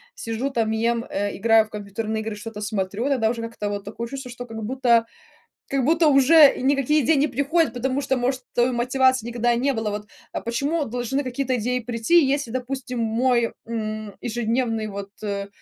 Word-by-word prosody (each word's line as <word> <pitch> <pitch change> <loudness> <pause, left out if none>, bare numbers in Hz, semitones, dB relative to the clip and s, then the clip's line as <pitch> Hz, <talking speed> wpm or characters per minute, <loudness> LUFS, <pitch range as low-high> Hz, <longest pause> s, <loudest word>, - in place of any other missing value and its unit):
сижу 235 - -3
там, 230 -5 0
ем, 230 +1 0
э, 205 +1 -2
играю 225 +1 +4
в - - -20
компьютерные 215 +1 -4
игры, 220 -1 -4
что-то 210 0 -8
смотрю, 205 +2 -2
тогда 255 -6 +2
уже 230 0 -3
как-то 230 -2 -4
вот 205 0 -4
такое 230 +3 -6
чувство, 270 -1 -6
что 245 0 -7
как 225 -2 -7
будто 235 -1 +2 0.6
как 275 -1 0
будто 325 +5 +3
уже 285 +2 +7
и - - -6
никакие 275 +2 +2
идеи 315 +7 +4
не 285 +2 +3
приходят, 285 +1 +1
потому 260 +2 -1
что, 265 -1 0
может, 255 +1 -1
э, 240 +1 +3
мотивации 255 0 +2
никогда 240 0 0
и - - 0
не 275 +3 +1
было, 225 -3 -2
вот. 210 0 -4 0.3
А - - -4
почему 285 +7 -1
должны 245 +4 -2
какие-то 260 0 -1
идеи 250 +3 -1
прийти, 240 +8 +2
если, 275 -3 0
допустим, 255 0 -4
мой, 235 +1 +1 0.2
м, 215 -2 -4
ежедневный 230 -1 -1
вот, 200 -1 -6
э, 200 -1 -3
240 Hz, 190 wpm, -23 LUFS, 220-265 Hz, 0.6 s, уже